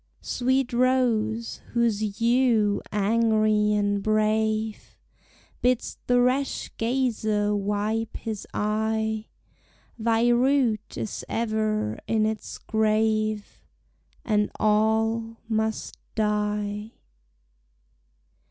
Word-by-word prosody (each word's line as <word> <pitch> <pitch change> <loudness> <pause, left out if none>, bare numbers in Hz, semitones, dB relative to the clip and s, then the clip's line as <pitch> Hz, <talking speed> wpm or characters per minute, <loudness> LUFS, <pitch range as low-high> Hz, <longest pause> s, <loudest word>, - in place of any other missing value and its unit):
Sweet 260 0 0
Rose, 235 -3 +1
whose 235 -3 +2 0.2
hue 230 -3 +3
angrie 215 0 +2
and 205 -1 +1
brave 215 0 0 0.6
Bids 250 -1 0
the 245 0 +4
rash 255 +3 0
gazer 220 -4 0
wipe 210 +2 -1
his 220 -3 -5
eye, 220 +1 -1 0.7
Thy 230 +1 +2
root 240 -3 +2
is 215 - -4
ever 215 - -1
in 220 -1 +2
its 220 0 -4
grave, 215 -1 0 0.6
And 210 -2 +2
all 220 +1 +1
must 220 -1 -2 0.2
die. 210 0 -1
220 Hz, 80 wpm, -25 LUFS, 210-230 Hz, 0.7 s, the